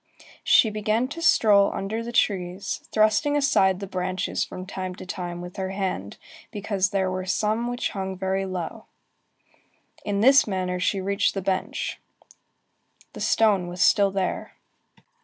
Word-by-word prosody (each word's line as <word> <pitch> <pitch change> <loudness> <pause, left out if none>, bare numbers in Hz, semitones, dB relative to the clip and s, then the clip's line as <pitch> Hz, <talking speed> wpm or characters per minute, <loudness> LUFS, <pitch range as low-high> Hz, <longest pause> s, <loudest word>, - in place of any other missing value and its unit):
She 220 - +5
began 215 +3 0
to 335 +4 -7
stroll 205 -10 +5
about - - -4
under 215 +4 -3
the 235 - -6
trees, 195 -3 -1
thrusting 220 +7 +3
aside 190 -10 +3
the 200 - -5
branches 185 0 -2
from 185 - -7
time 185 -1 -5
to - - -10
time 175 -1 -5
with 180 0 -9
her 190 -1 -2
hand, 190 - -3 0.3
because 200 -3 -1
there 190 -2 0
were 185 0 -4
some 215 +4 0
which 245 0 -2
hung 190 -1 -4
very 190 +1 -1
low. 185 +4 -5 1.2
In 200 -1 -1
this 270 +2 +6
manner 185 -2 -2
she 195 +2 0
reached 200 +2 0
the 195 - -2
bench. 190 0 -2 1.1
The - - -8
stone 205 -5 +2
was 175 +1 -1
still 200 -1 +4
there. 190 -1 -3
195 Hz, 155 wpm, -25 LUFS, 185-215 Hz, 1.2 s, this